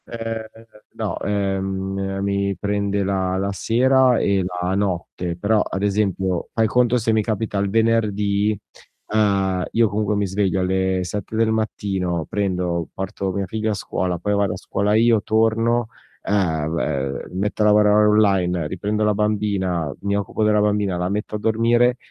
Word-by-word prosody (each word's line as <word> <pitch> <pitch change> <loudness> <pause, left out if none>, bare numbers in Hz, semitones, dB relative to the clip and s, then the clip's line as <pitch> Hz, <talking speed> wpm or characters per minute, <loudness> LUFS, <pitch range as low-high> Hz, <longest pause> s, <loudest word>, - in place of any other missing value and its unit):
Ehm, 115 -1 -5 0.5
no, - - -3
ehm, 95 -1 -2
mi 100 0 0
prende 100 0 -1
la 95 -1 -1
la 100 +1 -1
sera 125 +6 +3
e 100 -1 +1
la 90 0 -2
notte, 90 -3 -2
però 105 +4 +2
ad 95 - -3
esempio 95 -3 0
fai 115 - +2
conto 125 +2 +2
se 115 -1 +1
mi 110 - +3
capita 105 -1 -2
il 100 0 0
venerdì, 105 -2 +1 0.6
ehm, 100 -4 +2
io 115 -2 +3
comunque 105 0 -1
mi 100 0 0
sveglio 95 0 0
alle 95 0 0
7 105 +4 -5
del 110 0 +2
mattino 95 -6 -2
prendo, 90 -4 -1
porto 95 0 -4
mia 100 +1 -2
figlia 110 +3 -2
a - - 0
scuola, 90 -2 -2
poi 105 +4 -1
vado 100 -2 +1
a - - -6
scuola 105 +3 -1
io, 115 -1 +4
torno, 115 +2 +1 0.4
ehm, 80 -7 -1
b - - -15
metto 105 +3 -2
a - - +4
lavorare 105 0 +5
online, 95 -6 +2
riprendo 105 +6 -2
la 105 0 +3
bambina, 100 -6 -1
mi 100 0 0
occupo 100 +2 -2
della 105 -1 +3
bambina, 105 -3 +1
la 90 +1 -1
metto 105 +2 -3
a - - -3
dormire. 120 +3 +2
100 Hz, 160 wpm, -21 LUFS, 95-110 Hz, 0.6 s, lavorare